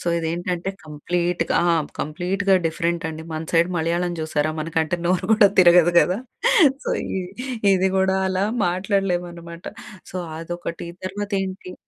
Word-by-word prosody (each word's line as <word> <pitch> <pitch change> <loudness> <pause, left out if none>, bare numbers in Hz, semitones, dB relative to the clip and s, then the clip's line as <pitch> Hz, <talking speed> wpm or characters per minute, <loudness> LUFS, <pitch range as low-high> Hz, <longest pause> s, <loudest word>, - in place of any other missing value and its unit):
So, - - -10
ఇదేంటంటే 175 +3 -2
కంప్లీట్‌గా 170 +3 -1
ఆ! 175 - +3 0.3
కంప్లీట్‌గా 185 +6 0
డిఫరెంట్ 170 +1 -1
అండి. 160 0 -7
మన 155 0 -3
సైడ్ 170 +1 +4
మలయాళం 170 +2 0
చూసారా! 155 -1 0
మనకంటే 160 +1 -1
నోరు 180 0 +1
కూడా 210 -2 +6
తిరగదు 175 -1 +7
కదా! 185 +3 +1 0.7
సో, - - -3 0.2
ఇది, 190 - -3 0.5
ఇది 190 0 +2
కూడా 190 0 +2
అలా 190 +1 0 0.2
మాట్లాడలేం 185 0 0
అన్నమాట. 170 0 -11 0.5
సో, - - -5 0.2
అదొకటి 170 0 -6 0.2
తర్వాత 205 +2 -5
ఏంటి 185 -1 -6
175 Hz, 135 wpm, -22 LUFS, 165-185 Hz, 0.7 s, తిరగదు